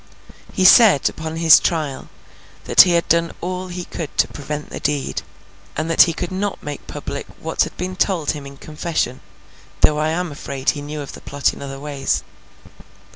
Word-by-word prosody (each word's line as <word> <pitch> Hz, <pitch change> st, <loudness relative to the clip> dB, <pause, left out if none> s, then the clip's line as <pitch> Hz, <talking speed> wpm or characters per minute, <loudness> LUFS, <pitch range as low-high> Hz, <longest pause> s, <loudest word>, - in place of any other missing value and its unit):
He 190 Hz, -, 0 dB
said, 200 Hz, -, +7 dB
upon 160 Hz, 0 st, -6 dB
his 165 Hz, -1 st, +7 dB
trial, 155 Hz, -6 st, -2 dB, 0.5 s
that -, -, +7 dB
he 180 Hz, -, +4 dB
had 170 Hz, 0 st, +1 dB
done 170 Hz, 0 st, +2 dB
all 185 Hz, +1 st, -4 dB
he 180 Hz, 0 st, -6 dB
could 160 Hz, -4 st, -7 dB
to -, -, +4 dB
prevent 150 Hz, +1 st, -6 dB
the -, -, -5 dB
deed, 145 Hz, -2 st, -2 dB, 0.6 s
and 160 Hz, +2 st, -1 dB
that 165 Hz, -, +7 dB
he -, -, -2 dB
could 175 Hz, +2 st, -5 dB
not 195 Hz, +2 st, -3 dB
make 145 Hz, -1 st, -7 dB
public -, -, -6 dB
what -, -, 0 dB
had -, -, -11 dB
been 185 Hz, +1 st, -4 dB
told 185 Hz, -5 st, +1 dB
him 145 Hz, -2 st, -7 dB
in 140 Hz, 0 st, -12 dB
confession—though 150 Hz, -3 st, -3 dB
I 155 Hz, +1 st, +1 dB
am 175 Hz, +1 st, -2 dB
afraid 140 Hz, -2 st, -2 dB
he 145 Hz, -, -7 dB
knew 150 Hz, +1 st, -6 dB
of 140 Hz, -, -8 dB
the -, -, -11 dB
plot 140 Hz, 0 st, -1 dB
in -, -, -11 dB
other 135 Hz, -1 st, -7 dB
ways. 145 Hz, -1 st, -2 dB
155 Hz, 185 wpm, -20 LUFS, 145-175 Hz, 0.6 s, said